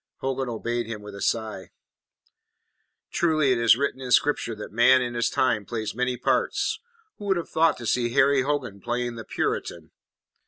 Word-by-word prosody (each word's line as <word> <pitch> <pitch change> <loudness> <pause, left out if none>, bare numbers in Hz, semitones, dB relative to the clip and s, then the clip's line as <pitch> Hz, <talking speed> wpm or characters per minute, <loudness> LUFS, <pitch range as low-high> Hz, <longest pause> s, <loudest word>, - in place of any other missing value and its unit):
Hogan 135 -1 -3
obeyed 120 0 -3
him 110 -2 -6
with 105 0 -9
a 100 - -9
sigh. 110 -4 -2 1.4
"Truly 155 -5 +2
it 125 - +2
is 115 -1 +5
written 135 -1 -2
in 130 - -6
Scripture 125 -2 +2
that 105 - -8
man 120 +4 +5
in 120 -1 -3
his 120 0 0
time 115 -5 +1
plays 110 0 -4
many 125 +1 -1
parts. 435 - 0 0.4
Who 205 - -7
would 190 -2 +2
have 170 - -4
thought 160 -1 +2
to 120 - -8
see 120 +2 +1
Harry 140 0 +4
Hogan 130 -8 -2
playing 120 0 -2
the 115 -1 -7
Puritan?" - - -3
125 Hz, 180 wpm, -25 LUFS, 115-135 Hz, 1.4 s, is